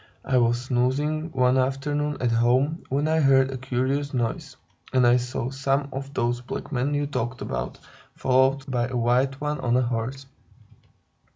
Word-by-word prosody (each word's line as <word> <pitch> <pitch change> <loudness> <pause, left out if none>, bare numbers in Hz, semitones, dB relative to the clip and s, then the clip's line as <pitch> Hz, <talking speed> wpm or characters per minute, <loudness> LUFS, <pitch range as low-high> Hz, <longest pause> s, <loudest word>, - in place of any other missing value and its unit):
"I 130 -1 +3
was 120 0 +2
snoozing, 140 +6 0
one 130 -1 +3
afternoon, 145 +3 -1
at 120 -2 +1
home, 125 +7 +2
when 140 +3 0
I 160 0 +2
heard 135 -2 +4
a 130 - -4
curious 130 +3 -1
noise, 130 +3 -3 0.3
and 130 -2 +3
I 120 +1 +6
saw 125 0 -3
some 135 +1 0
of 135 +1 -5
those 120 0 0
black 125 - -6
men 135 +2 0
you 145 0 0
talked 130 -3 -3
about, - - -4 0.4
followed 130 +1 +2
by 125 -3 -1
a 125 -1 -3
white 125 +3 +1
one 150 0 -2
on 120 -1 +1
a 130 - +3
horse. 125 +3 -3
130 Hz, 170 wpm, -25 LUFS, 125-140 Hz, 0.4 s, I